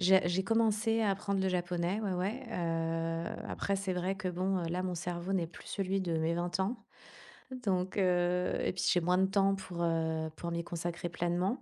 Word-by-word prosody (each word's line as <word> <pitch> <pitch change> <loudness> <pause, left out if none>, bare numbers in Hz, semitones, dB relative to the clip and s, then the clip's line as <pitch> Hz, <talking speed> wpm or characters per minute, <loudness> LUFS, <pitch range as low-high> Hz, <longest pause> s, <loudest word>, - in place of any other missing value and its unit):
J'ai 190 0 +5
j'ai 175 +2 +1
commencé 225 +1 +2
à 210 - +3
apprendre 195 0 0
le 190 - +2
japonais, 180 +2 0
ouais, 200 -3 -1
ouais, 210 +9 -2
heu, 165 -2 -1
après 200 - -1
c'est 195 -1 -1
vrai 180 +2 -1
que 195 - -5
bon, 185 +2 0
heu, 170 -2 -2
là 180 +2 -1
mon 180 -1 -2
cerveau 175 +2 -3
n'est 180 -3 +1
plus 165 - -13
celui 195 -1 0
de 170 -3 0
mes 160 +1 +1
20 175 +1 -1
ans. 220 +5 -1 0.8
Donc 185 -2 0
heu, 180 -1 +2
et - - +1
puis 185 - -2
j'ai 175 - +4
moins 180 +2 +3
de 190 - +4
temps 195 0 +3
pour, 180 -3 -5
heu, 160 -1 0
pour 170 - -4
m'y 170 0 -1
consacrer 170 0 -3
pleinement. 175 +8 0
180 Hz, 205 wpm, -33 LUFS, 170-195 Hz, 0.8 s, J'ai